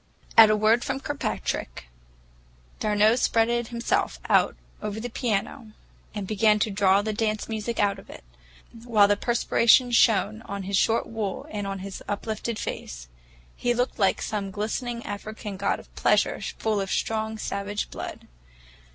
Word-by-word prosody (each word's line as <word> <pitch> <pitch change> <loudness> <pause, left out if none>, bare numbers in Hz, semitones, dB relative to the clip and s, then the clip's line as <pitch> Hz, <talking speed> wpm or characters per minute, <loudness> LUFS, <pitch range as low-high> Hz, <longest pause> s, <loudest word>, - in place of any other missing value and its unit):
At 225 -1 +9
a 215 - +4
word 220 +3 +3
from 270 -1 -2
Kirkpatrick, 275 - -3 0.9
d'Arnault 215 +2 +3
spread 235 0 +2
himself 235 0 -1
out - - +4 0.3
over 210 0 -4
the 245 +1 -5
piano, 225 0 -2 0.4
and 205 -2 -3
began 215 +1 +3
to 210 +1 0
draw 195 0 +3
the 215 0 -2
dance 215 0 -1
music 225 +1 -3
out 200 -1 +2
of - - -16
it, - - -11 0.6
while 215 -4 +4
the 205 - +3
perspiration 240 +2 +3
shone 220 -2 +3
on 200 0 -5
his 195 +1 -2
short 225 +4 +2
wool 215 -4 -4
and 205 -1 -3
on 195 0 -3
his 195 - -7
uplifted 215 +2 -3
face. - - -6 0.5
He 240 0 0
looked 245 0 -1
like 195 -2 +2
some 205 -2 -3
glistening 235 +4 -3
African 210 0 -6
god 200 +1 -1
of - - -17
pleasure, - - +2 0.2
full 215 -2 0
of 195 - -4
strong, 220 +1 -1
savage 205 0 -4
blood. - - -7
215 Hz, 155 wpm, -26 LUFS, 200-230 Hz, 0.9 s, At